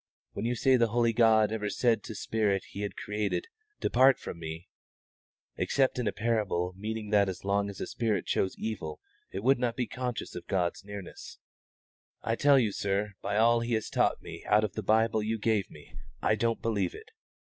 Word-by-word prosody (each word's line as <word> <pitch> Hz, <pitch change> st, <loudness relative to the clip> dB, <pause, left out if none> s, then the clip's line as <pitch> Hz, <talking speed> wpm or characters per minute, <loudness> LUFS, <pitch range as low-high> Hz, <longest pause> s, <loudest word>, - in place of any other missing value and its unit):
When 100 Hz, -, -4 dB
you 120 Hz, +1 st, 0 dB
say 130 Hz, +2 st, +4 dB
the 120 Hz, -1 st, +3 dB
holy 115 Hz, +1 st, +2 dB
God 110 Hz, -2 st, +4 dB
ever 105 Hz, -2 st, -2 dB
said 115 Hz, +2 st, +2 dB
to 110 Hz, -, -7 dB
spirit 100 Hz, -2 st, 0 dB
He 100 Hz, -, -6 dB
had 100 Hz, -1 st, -4 dB
created, 105 Hz, -, -2 dB, 0.3 s
'Depart 130 Hz, +2 st, +5 dB
from 85 Hz, -, -8 dB
Me' 80 Hz, +1 st, -7 dB, 0.9 s
(except 135 Hz, -2 st, +1 dB
in 120 Hz, -, -1 dB
a -, -, +2 dB
parable 105 Hz, -6 st, 0 dB
meaning 105 Hz, +1 st, -5 dB
that 100 Hz, -2 st, +4 dB
as 90 Hz, 0 st, -7 dB
long 100 Hz, +1 st, +1 dB
as 100 Hz, -, -8 dB
a -, -, -2 dB
spirit 110 Hz, -3 st, -1 dB
chose 95 Hz, -, 0 dB
evil 85 Hz, -9 st, -4 dB, 0.3 s
it 95 Hz, -, -5 dB
would 135 Hz, +1 st, +4 dB
not 120 Hz, -2 st, 0 dB
be 125 Hz, -1 st, -1 dB
conscious 125 Hz, 0 st, -4 dB
of 90 Hz, -, -8 dB
God's 90 Hz, -2 st, -1 dB
nearness), 100 Hz, -2 st, -9 dB, 0.9 s
I 115 Hz, -, 0 dB
tell 140 Hz, +2 st, +5 dB
you, 115 Hz, -5 st, +2 dB
sir, 100 Hz, +1 st, -1 dB
by 100 Hz, -, -1 dB
all 115 Hz, +1 st, +5 dB
He 115 Hz, +1 st, -2 dB
has 110 Hz, -, -3 dB
taught -, -, +1 dB
me -, -, -9 dB
out 105 Hz, +1 st, +4 dB
of 105 Hz, -, -2 dB
the 110 Hz, -, -3 dB
Bible 110 Hz, +2 st, +2 dB
you 110 Hz, +2 st, -1 dB
gave 105 Hz, -2 st, 0 dB
me, -, -, -15 dB, 0.3 s
I -, -, +2 dB
don't 115 Hz, +1 st, 0 dB
believe 100 Hz, -6 st, 0 dB
it. -, -, -12 dB
110 Hz, 200 wpm, -29 LUFS, 100-115 Hz, 0.9 s, Depart